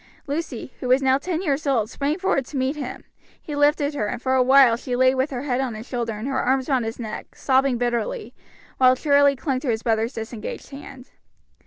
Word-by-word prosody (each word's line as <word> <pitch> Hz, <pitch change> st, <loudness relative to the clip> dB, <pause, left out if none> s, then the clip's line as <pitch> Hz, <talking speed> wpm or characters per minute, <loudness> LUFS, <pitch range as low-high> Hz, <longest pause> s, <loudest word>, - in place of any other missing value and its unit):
Lucy, 285 Hz, -4 st, -4 dB
who 255 Hz, -, -4 dB
was 255 Hz, +2 st, +3 dB
now 265 Hz, 0 st, +3 dB
ten 345 Hz, +3 st, -3 dB
years 290 Hz, -3 st, -1 dB
old, 235 Hz, -6 st, +2 dB
sprang 285 Hz, +7 st, -2 dB
forward 380 Hz, -7 st, 0 dB
to 275 Hz, +2 st, -7 dB
meet 260 Hz, +3 st, 0 dB
him; 275 Hz, -4 st, -6 dB, 0.4 s
he 300 Hz, -, -7 dB
lifted 290 Hz, 0 st, +2 dB
her, 245 Hz, -8 st, -2 dB
and 245 Hz, -, -4 dB
for 260 Hz, +1 st, -1 dB
awhile 260 Hz, -1 st, +6 dB
she 245 Hz, +1 st, -4 dB
lay 255 Hz, +1 st, +4 dB
with 265 Hz, +2 st, 0 dB
her 255 Hz, -1 st, -4 dB
head 260 Hz, -2 st, 0 dB
on 250 Hz, -4 st, -3 dB
his 220 Hz, +2 st, -9 dB
shoulder 235 Hz, -3 st, -3 dB
and 215 Hz, +4 st, -5 dB
her 270 Hz, -1 st, 0 dB
arms 260 Hz, +1 st, +1 dB
round 260 Hz, -4 st, +1 dB
his 225 Hz, +1 st, -4 dB
neck, 220 Hz, -3 st, -7 dB
sobbing 265 Hz, -1 st, +2 dB
bitterly, 245 Hz, -, -2 dB, 0.5 s
while 255 Hz, 0 st, +6 dB
Charlie 285 Hz, 0 st, +4 dB
clung 265 Hz, -1 st, -2 dB
to 265 Hz, -, -4 dB
his 225 Hz, -1 st, -1 dB
brother's 225 Hz, +1 st, 0 dB
disengaged 225 Hz, +3 st, -7 dB
hand. 275 Hz, -2 st, -11 dB
260 Hz, 215 wpm, -23 LUFS, 245-280 Hz, 0.5 s, awhile